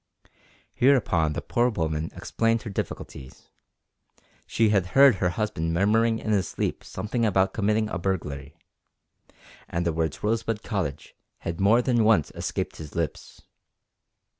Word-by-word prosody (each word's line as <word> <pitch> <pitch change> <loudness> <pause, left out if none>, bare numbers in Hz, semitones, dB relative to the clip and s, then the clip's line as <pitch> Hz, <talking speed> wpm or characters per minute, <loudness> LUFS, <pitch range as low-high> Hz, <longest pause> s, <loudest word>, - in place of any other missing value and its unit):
Hereupon 100 - +3
the - - -4
poor 120 +1 +1
woman 80 -6 -2
explained 115 0 0
her 110 - -6
difficulties. 65 -8 -7 1.0
She 110 -1 +2
had 100 -4 +2
heard 135 -6 +7
her 90 - +1
husband 85 -5 -2
murmuring 110 +5 +3
in 110 - -3
his 95 -4 +1
sleep - - -3
something 115 +2 -3
about 95 -3 +2
committing 110 +1 +1
a 95 - -4
burglary, 75 -6 -4 1.1
and 85 +1 -2
the 85 - +1
words 80 -2 -2
Rosebud 110 0 -1
Cottage 85 - -4 0.3
had 85 - -4
more 115 +5 +4
than 120 -3 +2
once 105 -9 +3
escaped - - -4
his 75 -3 -9
lips. - - -4
100 Hz, 140 wpm, -26 LUFS, 80-115 Hz, 1.1 s, heard